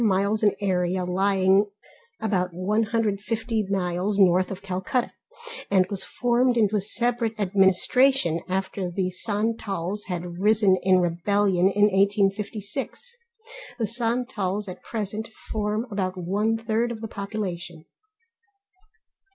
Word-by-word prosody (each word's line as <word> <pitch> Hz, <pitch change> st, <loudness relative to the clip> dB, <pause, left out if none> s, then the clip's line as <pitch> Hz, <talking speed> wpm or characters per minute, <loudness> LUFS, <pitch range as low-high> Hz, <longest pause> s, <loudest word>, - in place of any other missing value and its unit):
miles 200 Hz, +1 st, +2 dB
in 210 Hz, -2 st, +3 dB
area, 185 Hz, -2 st, 0 dB
lying 190 Hz, +1 st, +3 dB, 0.6 s
about 185 Hz, -4 st, 0 dB
150 215 Hz, +2 st, -1 dB
miles 190 Hz, +1 st, -1 dB
north 185 Hz, -1 st, +4 dB
of 195 Hz, 0 st, -7 dB
Calcutta, 190 Hz, +6 st, -1 dB, 0.6 s
and 190 Hz, -2 st, +4 dB
was 200 Hz, -, -1 dB
formed 245 Hz, 0 st, +1 dB
into 215 Hz, -2 st, +3 dB
a 205 Hz, -, +2 dB
separate 235 Hz, +1 st, -1 dB
administration 195 Hz, +1 st, +3 dB
after 190 Hz, 0 st, -2 dB
the 185 Hz, +1 st, -2 dB
Santals 205 Hz, -1 st, -2 dB
had 175 Hz, -1 st, -5 dB
risen 210 Hz, -1 st, +4 dB
in 185 Hz, -1 st, +4 dB
rebellion 185 Hz, +2 st, +2 dB
in 205 Hz, +1 st, +1 dB
1856. 205 Hz, -, 0 dB, 0.6 s
The 230 Hz, -, 0 dB
Santals 225 Hz, -3 st, -2 dB
at 185 Hz, -, -8 dB
present 215 Hz, 0 st, -4 dB, 0.2 s
form 215 Hz, +1 st, -1 dB
about 190 Hz, -2 st, -2 dB
one 205 Hz, +5 st, 0 dB
third 225 Hz, +1 st, -1 dB
of 230 Hz, -, -6 dB
the 225 Hz, -, -4 dB
population. 185 Hz, -6 st, -5 dB
200 Hz, 115 wpm, -25 LUFS, 185-220 Hz, 0.6 s, north